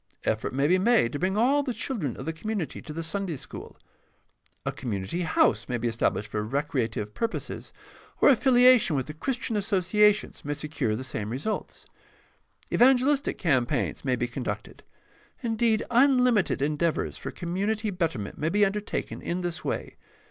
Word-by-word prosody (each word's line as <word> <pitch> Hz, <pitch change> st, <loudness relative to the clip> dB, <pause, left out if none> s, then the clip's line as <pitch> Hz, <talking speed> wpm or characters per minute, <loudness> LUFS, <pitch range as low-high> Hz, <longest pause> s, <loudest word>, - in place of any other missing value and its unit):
Effort 110 Hz, 0 st, -1 dB
may 140 Hz, +2 st, +1 dB
be 185 Hz, +3 st, +4 dB
made 220 Hz, -, +3 dB
to 145 Hz, -, -3 dB
bring 190 Hz, +3 st, 0 dB
all 270 Hz, +6 st, +4 dB
the 260 Hz, -4 st, -3 dB
children 190 Hz, -, -3 dB
of 130 Hz, -, -7 dB
the 160 Hz, -, -2 dB
community 200 Hz, 0 st, -4 dB
to -, -, -9 dB
the 165 Hz, +2 st, -4 dB
Sunday 175 Hz, +1 st, -2 dB
school. 130 Hz, -, -9 dB, 0.9 s
A -, -, 0 dB
community 110 Hz, -, -3 dB
house 165 Hz, -, +2 dB
may 125 Hz, -, 0 dB
be 120 Hz, +1 st, -1 dB
established 110 Hz, -2 st, 0 dB
for 105 Hz, -1 st, -1 dB
recreative 120 Hz, -4 st, -2 dB
purposes, 230 Hz, 0 st, -4 dB, 0.5 s
or -, -, +6 dB
affiliation 250 Hz, -, +5 dB
with 130 Hz, -, 0 dB
the 150 Hz, -, -7 dB
Christian 235 Hz, -, -3 dB
Associa 205 Hz, 0 st, +4 dB
tions 210 Hz, -, -9 dB
may 145 Hz, 0 st, -2 dB
secure 150 Hz, -7 st, -2 dB
the 125 Hz, -, -5 dB
same 110 Hz, -5 st, -4 dB
results. 140 Hz, -, -4 dB, 0.9 s
Evangelistic 270 Hz, +3 st, +4 dB
campaigns 140 Hz, -4 st, 0 dB
may 130 Hz, -2 st, +1 dB
be 120 Hz, 0 st, -1 dB
conducted. 120 Hz, +1 st, -5 dB, 0.6 s
Indeed, 225 Hz, -1 st, +1 dB
unlimited 250 Hz, -, +4 dB
endeavors 150 Hz, +3 st, 0 dB
for -, -, -5 dB
com 170 Hz, -1 st, -6 dB
munity 210 Hz, +1 st, -1 dB
betterment 155 Hz, -, -2 dB
may 155 Hz, -, 0 dB
be 205 Hz, +3 st, +4 dB
undertaken 205 Hz, +1 st, -3 dB
in 175 Hz, +2 st, -2 dB
this 175 Hz, -2 st, -4 dB
way. -, -, -4 dB
175 Hz, 165 wpm, -27 LUFS, 135-220 Hz, 0.9 s, or